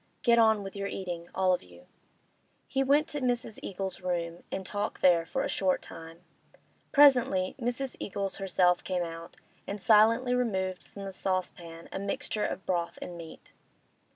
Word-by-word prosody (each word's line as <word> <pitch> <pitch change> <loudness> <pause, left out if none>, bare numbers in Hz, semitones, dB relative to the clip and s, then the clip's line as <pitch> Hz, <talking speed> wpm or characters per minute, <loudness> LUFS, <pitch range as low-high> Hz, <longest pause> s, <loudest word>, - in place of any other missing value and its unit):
Get 235 -3 +5
on 220 -2 +4
with 195 0 -8
your 200 0 -3
eatin', 175 -3 -5
all 185 -1 +3
of 180 - 0
you.' 90 0 -17 0.8
He 270 - +1
went 290 +3 +3
to 290 - -3
Mrs. 240 -3 -1
Eagles' 190 -2 -5
room 170 -2 -2
and 190 - -4
talked 205 +2 -3
there 170 -2 +5
for - - -1
a - - 0
short 185 -2 0
time. 165 +1 -10 0.7
Presently 245 -10 +5
Mrs. 245 +2 -2
Eagles 200 -1 -3
herself 180 -2 +2
came 180 -2 -1
out 165 0 -8 0.3
and 200 - -4
silently 230 +4 +5
removed 190 -7 -1
from 200 - -9
the 195 - -5
saucepan 175 -3 -3
a - - -4
mixture 210 +2 -2
of 190 - -3
broth 170 -2 -1
and 175 - -7
meat. 165 -2 -11
190 Hz, 165 wpm, -29 LUFS, 175-225 Hz, 0.8 s, Get